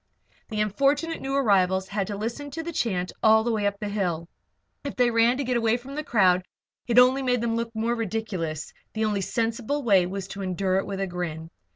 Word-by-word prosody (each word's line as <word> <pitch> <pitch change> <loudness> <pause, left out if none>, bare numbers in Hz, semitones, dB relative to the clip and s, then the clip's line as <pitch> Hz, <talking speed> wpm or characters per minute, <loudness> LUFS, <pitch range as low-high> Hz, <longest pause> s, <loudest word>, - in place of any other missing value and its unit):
The 215 -2 -1
unfortunate 280 - +1
new 270 0 -2
arrivals 190 -7 +2
had 200 -1 -2
to 205 - -4
listen 235 +7 -4
to 325 +4 -5
the 340 +1 -5
chant 185 -10 -1
all 220 0 +5
the 235 - 0
way 210 -2 +1
up 200 0 -3
the 210 - -3
hill. 180 -5 -2 0.6
If 285 - -5
they 245 -1 +3
ran 230 +2 +3
to 280 - -1
get 250 -1 0
away 230 0 +2
from 260 +3 -10
the 305 +2 -3
crowd, 185 -8 +3 0.4
it 240 -1 +1
only 255 +2 +6
made 250 -2 +1
them 230 -1 0
look 230 0 -2
the 220 -1 -4
more 235 +1 +1
ridiculous; 195 -9 -3 0.2
the 220 0 0
only 205 -2 0
sensible 230 +7 -1
way 195 -6 +4
was 195 +1 -5
to 200 - -6
endure 185 0 0
it 195 - -1
with 195 -1 -4
a - - +1
grin. 170 -3 -5
220 Hz, 225 wpm, -26 LUFS, 190-245 Hz, 0.6 s, only